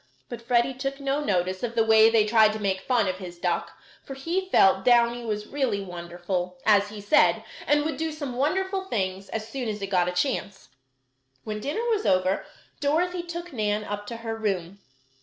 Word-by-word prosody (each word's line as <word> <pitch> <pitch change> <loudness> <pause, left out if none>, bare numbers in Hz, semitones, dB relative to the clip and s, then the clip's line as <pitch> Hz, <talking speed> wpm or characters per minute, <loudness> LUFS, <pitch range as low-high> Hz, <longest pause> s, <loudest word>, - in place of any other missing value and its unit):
But 240 -2 -7
Freddie 240 +2 +2
took 270 +2 -4
no 280 +1 -1
notice 185 -5 0
of 235 -1 -3
the 225 - +4
way 220 0 +7
they 225 -2 +4
tried 215 -1 +5
to 220 - -5
make 190 -2 -1
fun 235 -2 +1
of 185 0 -2
his 175 -2 -8
duck, 175 -1 -2 0.3
for 270 - -8
he 345 +8 -2
felt 190 - +4
Downy 240 0 +3
was 210 -2 -3
really 260 -7 -1
wonderful, 175 0 -4
as 205 -1 +4
he 210 0 -8
said, 205 +9 +3 0.2
and 295 0 +3
would 315 - -2
do 320 0 -2
some 285 -5 -5
wonderful 380 +8 0
things 195 - -3
as 220 -1 -4
soon 245 -1 -4
as 210 -1 -4
it 195 -1 -5
got 180 -2 +2
a - - -2
chance. 195 -1 -2 0.7
When 215 -1 -4
dinner 295 - -3
was 430 -2 0
over, 185 +1 +1 0.3
Dorothy 345 +5 0
took 345 -1 -7
Nan 210 -2 0
up 205 0 -5
to 235 - -5
her 225 0 -2
room. 200 -4 -3
220 Hz, 195 wpm, -26 LUFS, 195-275 Hz, 0.7 s, way